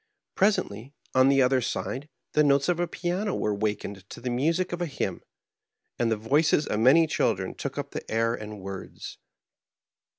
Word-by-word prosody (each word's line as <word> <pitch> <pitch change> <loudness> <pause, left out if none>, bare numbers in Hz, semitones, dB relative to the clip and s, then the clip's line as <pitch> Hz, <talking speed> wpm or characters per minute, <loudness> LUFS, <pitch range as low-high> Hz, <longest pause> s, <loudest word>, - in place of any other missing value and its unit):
Presently, 140 - 0 0.2
on 130 +1 +5
the 135 -1 +5
other 130 0 +3
side, 135 +4 -3 0.2
the 150 - +4
notes 140 -1 +3
of 175 -1 +1
a 175 - +1
piano 180 +4 -2
were 105 - 0
wakened 100 -2 -3
to - - -9
the 125 +1 -3
music 165 +9 0
of 175 - -3
a 175 - 0
hymn, 145 - -3 0.8
and 115 -1 +2
the 110 - +1
voices 145 +7 +2
of 105 - -1
many 135 +8 +6
children 155 - 0
took - - -5
up - - -4
the - - -6
air 115 +1 +1
and 105 -3 -7
words. 95 0 -8
130 Hz, 175 wpm, -27 LUFS, 110-160 Hz, 0.8 s, many